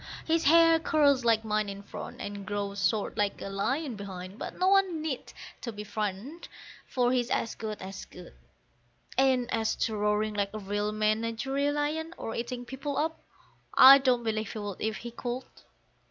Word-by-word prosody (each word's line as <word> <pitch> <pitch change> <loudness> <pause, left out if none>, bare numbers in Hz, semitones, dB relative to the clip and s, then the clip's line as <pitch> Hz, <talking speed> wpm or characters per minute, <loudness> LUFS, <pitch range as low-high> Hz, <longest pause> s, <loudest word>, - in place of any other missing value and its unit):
His 330 0 +1
hair 330 +2 +6
curls 290 -5 +3
like 225 -1 +3
mine 215 -1 0
in 200 0 -7
front, - - -8
and 200 0 -5
grows 200 -2 -1
short 210 +1 -3
like 205 -1 0
a - - -5
lion 255 +7 -1
behind, 190 0 -8
but - - -6
no 365 - +2
one 385 -4 +3
need 295 -5 -4 0.4
be 210 - -5
frightened, 210 - -4 0.4
for 245 -1 +1
he's 245 -2 +1
as 225 - 0
good 215 -2 -5
as 190 0 -7
good; - - -13 0.8
And 260 -2 +3
as 220 -1 0
to 220 - -1
roaring 210 +1 +1
like 200 0 -2
a - - -3
real 205 +1 -2
menagerie 230 +6 0
lion, 310 +3 -2
or 225 - -5
eating 245 +1 -4
people 275 +3 -4
up, 320 +1 -1 0.6
I 270 +1 +10
don't 255 -3 +2
believe 215 -2 -2
he - - -6
would 205 -3 -5
if 220 0 -1
he 235 - -7
could. 245 +2 -4
230 Hz, 175 wpm, -29 LUFS, 205-275 Hz, 0.8 s, I